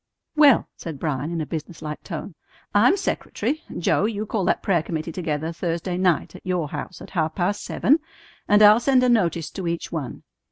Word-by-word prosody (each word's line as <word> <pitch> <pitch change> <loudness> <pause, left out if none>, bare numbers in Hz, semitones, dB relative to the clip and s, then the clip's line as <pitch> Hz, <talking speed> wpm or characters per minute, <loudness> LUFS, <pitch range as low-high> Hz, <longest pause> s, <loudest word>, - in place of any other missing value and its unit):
"Well," 295 -5 +6
said 160 -4 -7
Bryan 145 0 -2
in 170 -1 -2
a - - -2
business 160 +2 -6
like 150 0 -5
tone, 170 +1 -6 0.4
"I'm 240 - +5
secretary. 315 -4 -2 0.2
Joe, 180 +3 +2
you 215 -1 -2
call 205 -3 -1
that - - +1
prayer 175 -5 +2
committee 160 0 -4
together 160 -2 -2
Thursday 170 +1 -3
night 180 -4 +1
at - - -12
your 180 -5 -1
house 180 - -6
at - - -12
half 160 -4 -1
past 200 +3 -1
seven, 295 +6 +2 0.5
and 210 +1 +5
I'll 210 +2 +8
send 255 +1 +3
a 250 - +4
notice 170 -9 +1
to 190 -3 -5
each 170 0 -3
one. 150 -6 -5
175 Hz, 195 wpm, -23 LUFS, 160-210 Hz, 0.5 s, I'll